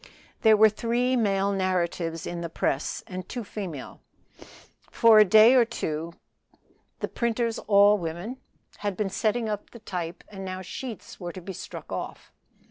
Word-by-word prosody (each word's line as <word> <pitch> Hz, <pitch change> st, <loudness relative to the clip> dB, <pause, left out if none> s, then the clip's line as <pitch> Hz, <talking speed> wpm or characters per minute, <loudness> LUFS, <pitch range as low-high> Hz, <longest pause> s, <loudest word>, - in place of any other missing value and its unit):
There 220 Hz, -1 st, +6 dB
were 220 Hz, +1 st, +8 dB
three 240 Hz, +4 st, 0 dB
male 200 Hz, -4 st, +1 dB
narratives 175 Hz, -3 st, -1 dB
in 175 Hz, 0 st, -4 dB
the 170 Hz, -, -4 dB
press 140 Hz, -3 st, -2 dB
and 185 Hz, -1 st, -7 dB
two 245 Hz, -2 st, -4 dB
female. 190 Hz, -9 st, -7 dB, 0.9 s
For 225 Hz, -2 st, +6 dB
a -, -, +10 dB
day 215 Hz, +4 st, +7 dB
or 255 Hz, -2 st, +6 dB
two 165 Hz, -6 st, -4 dB, 0.4 s
past -, -, -37 dB
the -, -, -1 dB
printers 235 Hz, -1 st, -1 dB
(all 205 Hz, 0 st, +5 dB
women) 175 Hz, +9 st, -5 dB, 0.4 s
had 205 Hz, -2 st, -3 dB
been 205 Hz, -3 st, -1 dB
setting 220 Hz, +3 st, 0 dB
up 210 Hz, -1 st, -4 dB
the -, -, -12 dB
type 180 Hz, -5 st, -5 dB
and 195 Hz, -2 st, -9 dB
now 185 Hz, -1 st, -4 dB
the 185 Hz, -, -7 dB
sheets 230 Hz, +4 st, -8 dB
were 175 Hz, -1 st, -5 dB
to 185 Hz, -, -8 dB
be 190 Hz, +2 st, -7 dB
struck -, -, -9 dB
off. -, -, -6 dB
200 Hz, 170 wpm, -26 LUFS, 180-225 Hz, 0.9 s, a